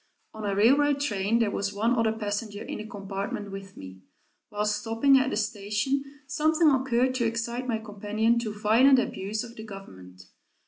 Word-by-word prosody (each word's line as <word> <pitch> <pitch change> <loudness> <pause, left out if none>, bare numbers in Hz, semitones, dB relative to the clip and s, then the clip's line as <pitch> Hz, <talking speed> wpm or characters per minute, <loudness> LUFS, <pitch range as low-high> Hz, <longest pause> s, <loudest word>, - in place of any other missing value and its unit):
On 220 - -8
a 195 - -1
railroad 280 +7 +4
train 215 -5 0
there 225 -3 +1
was 200 0 -2
one 225 +4 +2
other 230 -2 +2
passenger 210 -1 -4
in - - -6
the 215 - -7
compartment 200 -1 -5
with 195 0 -9
me. 95 0 -10 0.5
While 210 0 -2
stopping 225 +6 +3
at 260 +1 0
a - - -1
station, 215 +5 -1 0.2
something 310 +2 +3
occurred 260 -1 +2
to 240 -2 +1
excite 235 +2 -3
my 230 -3 0
companion 220 +2 0
to 225 -2 -3
violent 225 +6 +4
abuse 215 -3 -2
of 235 0 -10
the 220 - -8
government. 95 - -11
220 Hz, 175 wpm, -27 LUFS, 205-245 Hz, 0.5 s, railroad